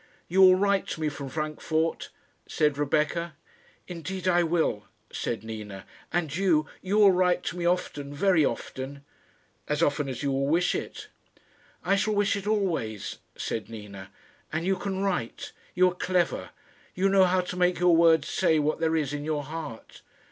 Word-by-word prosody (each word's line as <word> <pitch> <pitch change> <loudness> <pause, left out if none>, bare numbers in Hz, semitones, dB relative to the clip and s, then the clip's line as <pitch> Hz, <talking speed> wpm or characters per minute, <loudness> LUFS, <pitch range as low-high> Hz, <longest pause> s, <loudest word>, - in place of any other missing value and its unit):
"You 190 +3 +3
will 185 -1 +8
write 200 0 +1
to - - -5
me 155 - +1
from 140 -2 -7
Frankfort?" 155 +2 -2 0.4
said 150 -2 +1
Rebecca. 155 +4 0 0.5
"Indeed 185 +2 -5
I 175 -1 +4
will," 160 -11 0 0.3
said 115 - -3
Nina; 105 -3 -7 0.3
"and 160 -5 -1
you, 170 -5 +2 0.2
you 195 +3 -1
will 205 -2 +7
write 180 -1 +2
to 180 - -4
me 170 -1 0
often, 145 -5 -1
very 165 +2 +3
often?" 140 +1 -4 0.6
"As 150 +2 0
often 145 -2 +1
as 130 +2 -5
you 140 - 0
will 135 +1 0
wish 170 +4 +2
it." - - -6 0.8
"I 195 - +3
shall 210 +2 0
wish 205 -1 +2
it 200 0 -5
always," 170 - -1 0.2
said 110 -1 -4
Nina; 100 -3 -9 0.4
"and 160 +2 -2
you 190 +1 +2
can 190 +1 -3
write; 180 -12 -2 0.2
you 185 0 +5
are - - -8
clever. 180 -1 -1 0.5
You 190 +2 +2
know 195 -1 +5
how 185 0 +2
to 180 0 -6
make 180 0 +2
your 175 -1 +4
words 165 -3 +5
say 170 -4 +2
what 155 +1 0
there 160 0 +1
is 150 -3 -1
in 145 0 -4
your 150 -1 -2
heart." 150 -5 -8
165 Hz, 175 wpm, -27 LUFS, 145-185 Hz, 0.8 s, will